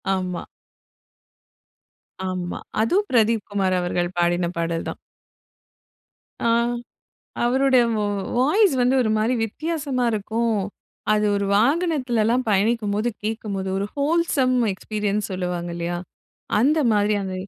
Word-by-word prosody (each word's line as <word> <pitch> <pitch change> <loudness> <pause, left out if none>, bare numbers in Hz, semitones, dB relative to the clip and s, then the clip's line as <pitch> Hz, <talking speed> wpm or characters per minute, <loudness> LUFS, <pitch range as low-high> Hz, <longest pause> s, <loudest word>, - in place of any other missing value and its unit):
ஆமா. 180 -2 -3 1.9
ஆமா. 180 -1 -4 0.2
அதும் 370 - +2
பிரதீப் 225 -2 +2
குமார் 190 -2 +1
அவர்கள் 175 0 -1
பாடின 175 0 +2
பாடல் 165 0 -2
தான். - - -6 1.4
ஆ, - - +1 1.0
அவரோட, 265 +2 +3 0.2
வா 210 - 0 0.3
வாய்ஸ் 320 - +4
வந்து 250 +1 +3
ஒரு 220 - 0
மாரி 230 +4 +1
வித்தியாசமா 285 +1 -2
இருக்கும். 220 +1 0 0.5
அது 210 0 +2
ஒரு 200 0 -1
வாகனத்துல்லாம் 255 - +2
பயணிக்கும்போது 210 +1 +1
கேக்கும்போது 210 -3 -3
ஒரு 200 - -1
ஹோல்சம் 285 -4 +2 0.2
எக்ஸ்பீரியன்ஸ் 210 +1 -2
சொல்லுவாங்க. 180 -1 -3
இல்லையா? 170 +1 -3 0.6
அந்த 285 +8 +3
மாரி 210 0 +2
அந்த 190 -1 -4
215 Hz, 105 wpm, -23 LUFS, 190-255 Hz, 1.9 s, வாய்ஸ்